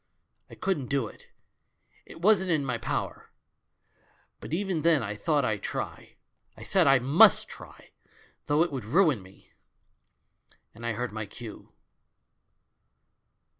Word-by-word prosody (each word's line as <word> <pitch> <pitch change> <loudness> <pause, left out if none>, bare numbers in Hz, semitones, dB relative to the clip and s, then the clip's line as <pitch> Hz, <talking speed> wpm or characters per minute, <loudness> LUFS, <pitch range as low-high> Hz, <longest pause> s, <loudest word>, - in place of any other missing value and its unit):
I - - -12
couldn't 170 -9 -2
do 140 -2 0
it, - - -13 0.8
it 165 - -13
wasn't 190 -2 +4
in 155 -5 +1
my 125 -3 -2
power; 115 - -4 1.1
but - - -9
even 180 -1 -1
then 160 -5 +3
I 105 0 -3
thought 145 +3 +1
I'd 105 -2 -1
try. - - -6 0.4
I - - -10
said - - +2
I 135 0 +6
miist 135 +6 +5
try^ - - -13 0.6
though 150 +2 +3
it 175 - -3
would 130 -4 -4
ruin 150 - +3
me! 95 +1 -19 1.2
And 115 +2 -7
I 120 - 0
heard 125 +3 -3
my 110 -1 -5
cue. 110 +1 -11
140 Hz, 135 wpm, -28 LUFS, 115-165 Hz, 1.2 s, I